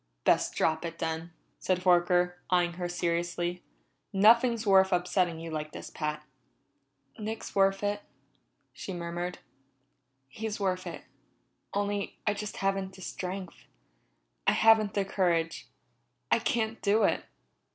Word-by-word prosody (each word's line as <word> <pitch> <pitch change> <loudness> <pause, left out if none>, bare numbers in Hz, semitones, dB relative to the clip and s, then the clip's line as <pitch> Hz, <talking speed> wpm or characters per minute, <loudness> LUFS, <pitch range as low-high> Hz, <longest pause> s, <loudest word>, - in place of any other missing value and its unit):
"Best - - +3
drop 160 0 +1
it, 165 -1 -5
then," 160 +1 -3 0.3
said 185 -1 0
Horker, 180 0 +4 0.2
eyeing 175 -1 +2
her 175 - -1
seriously. 175 0 -1 0.5
"Nothing's 230 +3 +5
worth 190 -1 +5
upsetting 180 -2 +1
yourself 165 0 -6
like 155 0 -4
this, - - -8
Pat." 150 -1 -3 1.0
"Nick's 220 +1 -5
worth 195 0 +3
it," 205 0 0 0.7
she 190 - -6
murmured. 175 +1 -4 0.9
"He's 215 +10 -5
worth 185 -2 -1
it - - -7 0.7
only 205 0 -1
I 210 - +3
just 210 0 -5
haven't 195 -1 -1
the 190 - -13
strength. 185 0 -6 0.8
I - - +6
haven't 220 -2 +5
the 200 -1 +1
courage. 170 -4 0 0.6
I - - +5
can't 225 -3 -1
do 210 +2 +3
it!" - - +2
185 Hz, 130 wpm, -29 LUFS, 175-205 Hz, 1.0 s, I